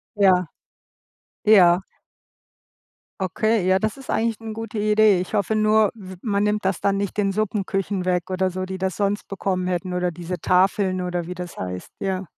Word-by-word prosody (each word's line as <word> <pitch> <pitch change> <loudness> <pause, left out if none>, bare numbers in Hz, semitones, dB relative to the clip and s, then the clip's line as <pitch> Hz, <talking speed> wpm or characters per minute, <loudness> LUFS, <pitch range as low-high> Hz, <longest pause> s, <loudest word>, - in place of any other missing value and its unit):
Ja. 185 -3 +4 1.0
Ja. 190 -4 +6 1.4
Okay, 210 +3 +1
ja, 185 - +4
das 215 +6 -2
ist 270 - -13
eigentlich 225 -1 0
'ne 225 -1 -6
gute 225 -1 -5
Idee. 210 -2 +4
Ich 185 - -5
hoffe 210 +2 +1
nur, 215 -1 +3
w 190 -4 -10
man 205 -2 +1
nimmt 210 -1 0
das 190 -2 0
dann 200 0 +1
nicht 200 -2 -3
den 200 -1 +1
Suppenküchen 195 -2 -2
weg 180 0 0
oder 185 0 +1
so, 185 +1 -4
die 190 0 -6
das 190 0 -1
sonst 205 0 -1
bekommen 185 -2 -2
hätten 180 0 -2
oder 180 0 0
diese 175 +2 -6
Tafeln 185 +1 +2
oder 175 -2 -3
wie 180 - -5
das 180 0 -7
heißt, 90 0 -5
ja. 190 -1 -2
190 Hz, 180 wpm, -23 LUFS, 180-210 Hz, 1.4 s, Ja